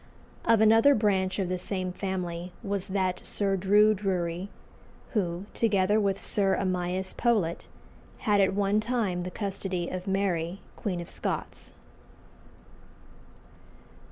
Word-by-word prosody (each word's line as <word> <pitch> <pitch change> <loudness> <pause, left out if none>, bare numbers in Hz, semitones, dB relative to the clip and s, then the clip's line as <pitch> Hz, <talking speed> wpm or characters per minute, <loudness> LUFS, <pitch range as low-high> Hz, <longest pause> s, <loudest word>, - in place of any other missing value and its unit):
Of 230 -2 +4
another 225 +6 +6
branch 195 -3 +1
of 195 -3 0
the 180 0 -2
same 185 0 -2
family 180 -2 -4
was 200 -2 -2
that 185 -2 -1
Sir 200 -1 +1
Drue 205 +3 +5
Drury, 185 -2 -2 0.6
who, 180 -4 -1
together 205 -2 +2
with 200 -2 0
Sir 195 -2 +1
Amias 185 0 -1
Powlett, 210 -9 0 0.6
had 205 -3 +4
at 190 0 +2
one 200 +1 +2
time 215 -6 -1
the 180 - -4
custody 185 -2 -3
of 185 +1 -5
Mary, 190 -2 0 0.2
Queen 180 -4 -3
of 170 - -8
Scots. - - -4
195 Hz, 125 wpm, -28 LUFS, 180-205 Hz, 0.6 s, another